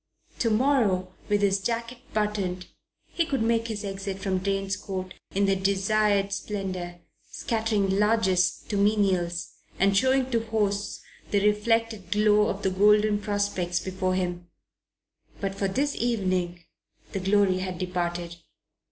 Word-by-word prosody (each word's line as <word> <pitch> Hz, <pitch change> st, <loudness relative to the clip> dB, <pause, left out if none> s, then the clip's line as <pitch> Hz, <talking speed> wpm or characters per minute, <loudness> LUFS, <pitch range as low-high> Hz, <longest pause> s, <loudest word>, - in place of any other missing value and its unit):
To 230 Hz, -, +2 dB
morrow, 215 Hz, -7 st, +2 dB, 0.2 s
with 205 Hz, 0 st, +2 dB
his 195 Hz, -1 st, +3 dB
jacket 235 Hz, +3 st, -3 dB
buttoned, 200 Hz, -4 st, -1 dB, 0.4 s
he 340 Hz, -, 0 dB
could 275 Hz, -7 st, -1 dB
make 230 Hz, 0 st, +1 dB
his 215 Hz, -2 st, -4 dB
exit 195 Hz, 0 st, -4 dB
from 195 Hz, -1 st, -1 dB
Drane's 195 Hz, 0 st, -1 dB
Court 185 Hz, -1 st, -5 dB, 0.2 s
in 200 Hz, +1 st, +3 dB
the 195 Hz, 0 st, +3 dB
desired 200 Hz, +1 st, +1 dB
splendour 185 Hz, -4 st, -4 dB, 0.3 s
scattering 215 Hz, -4 st, 0 dB
largesse 210 Hz, -4 st, +2 dB
to 205 Hz, -, -1 dB
menials 190 Hz, -5 st, +1 dB, 0.3 s
and 195 Hz, +1 st, +3 dB
showing 260 Hz, +4 st, +2 dB
to 230 Hz, -2 st, +1 dB
hosts 205 Hz, -2 st, -1 dB, 0.3 s
the 200 Hz, 0 st, +2 dB
reflected 215 Hz, -2 st, +1 dB
glow 210 Hz, +1 st, +4 dB
of 195 Hz, +1 st, -3 dB
the 190 Hz, -, +1 dB
golden 210 Hz, +2 st, +4 dB
prospects 205 Hz, -4 st, -1 dB
before 185 Hz, 0 st, -2 dB
him; 175 Hz, -1 st, -2 dB, 0.9 s
but 195 Hz, -1 st, -2 dB
for 195 Hz, 0 st, -1 dB
this 280 Hz, +9 st, 0 dB
evening 185 Hz, -7 st, -1 dB, 0.5 s
the 195 Hz, -, -2 dB
glory 195 Hz, -1 st, +3 dB
had 185 Hz, -1 st, -4 dB
departed. 175 Hz, -1 st, -3 dB
200 Hz, 135 wpm, -26 LUFS, 185-215 Hz, 0.9 s, glow